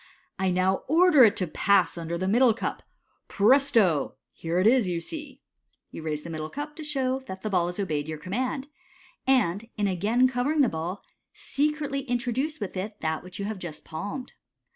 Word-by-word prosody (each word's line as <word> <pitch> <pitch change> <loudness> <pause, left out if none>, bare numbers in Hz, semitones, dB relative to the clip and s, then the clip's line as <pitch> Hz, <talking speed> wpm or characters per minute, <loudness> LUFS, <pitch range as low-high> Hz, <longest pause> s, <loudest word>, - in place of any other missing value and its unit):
" - - -35
I 190 0 +1
now 185 +1 +2
order 325 -2 +6
it 210 - +2
to 185 - 0
pass 195 +3 +2
under 170 0 -4
the 185 +2 -2
middle 235 +2 +4
cup. - - -3 0.5
Presto! 215 - +3 0.2
Here 165 +1 -3
it 185 - +2
is, 230 -4 +4
you 170 -1 -1
see." 290 - -7 0.5
You - - -7
raise 155 -1 -3
the 170 - -7
middle 155 -1 -4
cup 295 - -6
to 315 - -6
show 265 -3 -1
that 190 0 -7
the 215 - -2
ball 175 -2 +2
has 180 +3 -5
obeyed 155 -7 -1
your 155 0 -4
command, 255 - -3 0.6
and, 230 -5 +2
in 205 -1 +1
again 210 +7 +2
covering 265 +4 +1
the 255 - +4
ball, 170 +5 -4 0.3
secretly 295 -1 -1
introduce 255 +4 -1
with 205 -3 -5
it 205 +3 -5
that 160 0 -2
which 180 0 -9
you 200 - -3
have 210 -1 -4
just 170 -4 -7
palmed. 205 +10 -6
205 Hz, 190 wpm, -26 LUFS, 180-265 Hz, 0.6 s, order